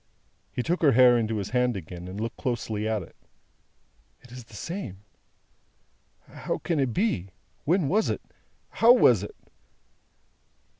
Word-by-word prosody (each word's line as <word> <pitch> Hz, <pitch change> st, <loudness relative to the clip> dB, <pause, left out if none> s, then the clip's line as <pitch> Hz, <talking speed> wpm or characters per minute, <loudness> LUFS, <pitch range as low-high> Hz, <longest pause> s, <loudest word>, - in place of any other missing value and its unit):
He 125 Hz, -, -3 dB
took 175 Hz, +5 st, -1 dB
her 145 Hz, -4 st, +5 dB
hair 125 Hz, 0 st, +7 dB
into 110 Hz, -2 st, 0 dB
his 100 Hz, -1 st, -4 dB
hand 125 Hz, -3 st, +1 dB
again, 90 Hz, 0 st, -8 dB
and 95 Hz, +3 st, -7 dB
looked 115 Hz, +1 st, -4 dB
closely 110 Hz, -4 st, -2 dB
at 110 Hz, -3 st, -1 dB
it. -, -, -16 dB, 1.1 s
"It 125 Hz, -, -17 dB
is 125 Hz, -1 st, -10 dB
the 115 Hz, -, -15 dB
same. 115 Hz, -, -6 dB, 1.2 s
How -, -, -4 dB
can 160 Hz, -1 st, -2 dB
it 135 Hz, -3 st, +1 dB
be! 110 Hz, -, -1 dB, 0.4 s
When 170 Hz, 0 st, +2 dB
was 210 Hz, +9 st, +2 dB
it! -, -, -2 dB, 0.5 s
How 235 Hz, +2 st, +6 dB
was 125 Hz, -, +5 dB
it!" 105 Hz, -, -8 dB
120 Hz, 150 wpm, -26 LUFS, 105-150 Hz, 1.2 s, hair